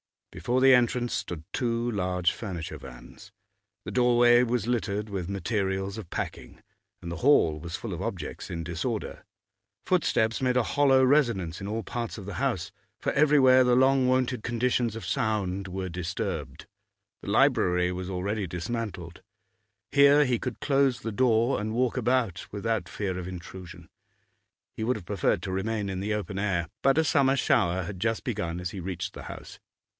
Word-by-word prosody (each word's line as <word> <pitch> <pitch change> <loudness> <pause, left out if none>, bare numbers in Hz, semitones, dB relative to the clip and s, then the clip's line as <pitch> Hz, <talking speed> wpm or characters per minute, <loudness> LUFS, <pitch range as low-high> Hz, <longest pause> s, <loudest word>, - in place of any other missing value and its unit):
Before 120 +11 -1
the 135 0 +7
entrance 120 0 +2
stood 90 -6 -4
two 120 -1 -1
large 90 -3 0
furniture 90 -7 -6
vans; - - -13 0.5
the - - -6
doorway 120 -1 +5
was 120 -3 0
littered 105 -3 -1
with 95 -3 -4
materials 100 -1 -2
of 105 -6 -8
packing, - - -6 0.4
and 85 - -5
the 85 - -4
hall 80 - +4
was 85 +2 -6
full - - -5
of - - -5
objects - - -5
in 85 -1 -4
disorder, 90 +7 -4 0.6
footsteps 115 -11 +1
made 130 -1 +1
a 125 - +3
hollow 135 +1 +3
resonance 120 - +2
in 100 - -5
all 110 +2 -3
parts 120 -2 -4
of 100 - -8
the 100 -2 -6
house, - - -1 0.3
for - - -2
everywhere 140 -3 +5
the 125 0 +4
long 130 0 +4
wonted 130 -1 +1
conditions 120 0 0
of 115 - -7
sound 100 -3 -1
were 95 0 -4
disturbed. 90 0 -4 0.6
The - - -7
library 90 0 +3
was 90 +1 -5
already 100 +2 -2
dismantled; 90 -1 -5 0.7
here 140 +1 +6
he 125 -3 0
could 125 -3 -5
close 135 -3 +2
the 115 - -4
door 120 +2 +2
and 110 +1 -3
walk 125 +1 0
about 120 -7 0
without 105 -3 -2
fear 95 -3 -3
of 90 - -6
intrusion. 90 -1 -9 0.9
He 110 - -3
would 125 +2 +1
have 100 - -8
preferred 100 0 0
to 95 - -4
remain 100 +2 -2
in 95 -1 -3
the 105 +2 -1
open 100 -2 -4
air, 90 -4 -1
but 135 +1 +3
a 160 - +4
summer 135 -3 +3
shower 95 -8 +2
had 95 +1 -7
just 115 +3 -1
begun 90 -8 -3
as 90 -1 -4
he 100 - -6
reached 90 +1 -4
the - - -9
house. - - -10
110 Hz, 170 wpm, -27 LUFS, 90-125 Hz, 0.9 s, the